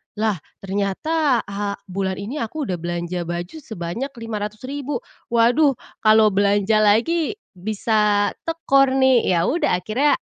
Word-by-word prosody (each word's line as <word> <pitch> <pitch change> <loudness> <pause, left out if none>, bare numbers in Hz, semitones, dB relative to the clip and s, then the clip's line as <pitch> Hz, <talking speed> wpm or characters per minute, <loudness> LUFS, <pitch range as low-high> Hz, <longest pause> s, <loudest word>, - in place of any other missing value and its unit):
Lah, 210 -5 0 0.2
ternyata, 230 +8 0
ha 200 0 -3 0.2
bulan 190 0 -1
ini 225 +10 -5
aku 290 +7 -3
udah 180 -8 -3
belanja 175 0 -3
baju 175 - -4
sebanyak 220 - -5
500 215 -1 -5
ribu, 280 -1 -4 0.2
waduh, 245 +5 +3 0.2
kalau 215 -1 +5
belanja 205 +2 +2
lagi, 240 - +2 0.2
bisa 210 +1 +1 0.2
tekor 275 -5 +3
nih. 260 -2 +4
Yaudah 215 - +1
akhirnya, 220 +11 +1
215 Hz, 125 wpm, -21 LUFS, 195-265 Hz, 0.2 s, kalau